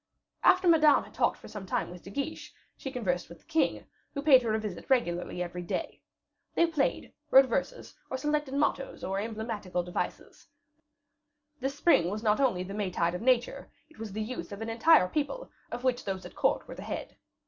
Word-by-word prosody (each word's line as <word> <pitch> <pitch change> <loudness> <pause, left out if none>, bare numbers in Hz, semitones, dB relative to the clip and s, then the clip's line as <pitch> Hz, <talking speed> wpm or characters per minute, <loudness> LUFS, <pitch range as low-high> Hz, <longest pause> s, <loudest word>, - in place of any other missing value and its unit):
After 365 0 +5
Madame 310 -3 +6
had - - -15
talked - - +1
for - - -13
some 200 -3 -8
time - - -1
with 180 -1 -10
De - - -11
Guiche, 280 +9 -4 0.2
she 270 - -6
conversed 185 -10 -2
with 170 - -11
the - - -31
king, 320 0 0 0.3
who 280 - -3
paid 270 -4 +7
her 230 -2 -1
a - - 0
visit 210 0 -6
regularly 180 -8 +1
every 180 0 -6
day. 175 - -4 0.5
They 335 - +5
played, 315 -4 -1 0.2
wrote 270 +1 +8
verses, 270 - -3 0.2
or 260 - -2
selected 295 -1 -1
mottoes 280 -1 -1
or 195 +1 -1
emblematical 215 -4 -3
devices; 175 0 -5 1.1
this 270 +2 -2
spring 290 - +4
was 210 +3 -4
not 210 +1 +3
only 240 -10 +2
the 195 +2 -7
Maytide 185 -4 0
of 180 - -4
nature, 255 +2 +1 0.2
it 310 - -20
was 220 -2 -6
the 215 +2 -3
youth 245 0 -6
of 200 +2 -7
an 225 - -4
entire 230 - +5
people, 310 - -3 0.2
of 245 +1 -6
which 255 -1 +1
those 190 -2 -4
at - - -10
court - - +1
were - - -7
the - - -9
head. - - -6
230 Hz, 200 wpm, -29 LUFS, 190-280 Hz, 1.1 s, wrote